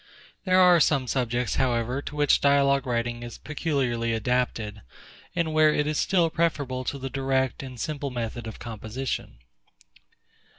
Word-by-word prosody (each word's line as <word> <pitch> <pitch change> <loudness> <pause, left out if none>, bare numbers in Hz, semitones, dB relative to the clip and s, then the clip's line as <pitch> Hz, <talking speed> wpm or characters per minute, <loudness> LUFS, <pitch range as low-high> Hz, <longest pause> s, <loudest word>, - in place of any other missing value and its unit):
There 185 -1 +4
are 180 -2 +7
some 140 -4 +3
subjects, 125 -2 -1
however, 125 0 0
to 145 - -8
which 145 -1 +3
dialogue 140 -1 +3
writing 120 -1 -1
is 120 -1 -8
peculiarly 130 -7 -1
adapted, 115 -2 -1 0.5
and 165 -3 0
where 155 0 +5
it 150 - +1
is 150 0 -1
still 175 -4 +2
preferable 145 -6 -1
to 140 - -2
the 135 0 -5
direct 135 -1 0
and 130 -3 -9
simple 145 +2 -3
method 120 -2 -4
of 110 - -7
composition. 115 - -5
130 Hz, 145 wpm, -26 LUFS, 120-145 Hz, 0.5 s, are